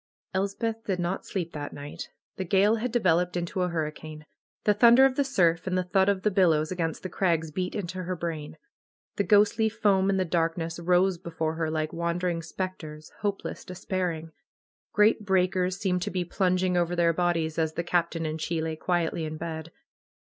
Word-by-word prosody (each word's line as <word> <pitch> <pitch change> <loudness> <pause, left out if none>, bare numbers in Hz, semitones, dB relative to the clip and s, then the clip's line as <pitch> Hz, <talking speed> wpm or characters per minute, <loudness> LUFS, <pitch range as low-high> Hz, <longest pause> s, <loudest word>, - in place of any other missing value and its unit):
Elsepth 220 +4 -2
did 190 -3 -1
not 175 +2 -3
sleep 175 -4 -3
that 145 -1 -5
night. 145 +1 -8 0.3
The 190 - -2
gale 200 +5 +3
had 240 +2 -2
de 240 - +2
veloped 180 -2 +2
into 175 +2 -2
a 180 - +1
hurricane. 155 -1 -5 0.4
The 210 - +4
thunder 235 +5 +7
of 270 - +3
the 280 - +2
surf 175 -10 +2
and 185 0 0
the 185 - +1
thud 190 +2 +2
of 195 -1 0
the 210 - +2
billows 165 -5 +3
against 165 -3 -2
the - - -2
crags 165 -4 0
beat 180 +3 -3
into 185 -2 -4
her 185 0 -3
brain. 160 -3 -5 0.6
The 200 - +2
ghostly 210 +2 +4
foam, 205 -3 +2
in 195 - +2
the 185 - +1
darkness, 165 0 -1
rose 180 +1 +2
before 165 -2 -3
her, 160 -1 -2
like 155 0 -2
wandering 170 0 -1
spectres, 160 -3 -6
hopeless, 205 -1 -3
despair 185 0 -2
ing. 160 0 -8 0.6
Great 210 +1 +3
breakers 185 -1 +1
seemed 185 -2 0
to - - -2
be 180 -2 -2
plunging 185 0 +1
over 175 0 +1
their 170 -1 +3
bodies, 165 -2 0
as 160 -1 0
the 170 - -2
Captain 170 -1 0
and 155 0 -3
she 165 +1 -1
lay 160 0 -2
quietly 170 -1 -1
in 155 0 -5
bed. 160 0 -6
180 Hz, 190 wpm, -27 LUFS, 165-190 Hz, 0.6 s, thunder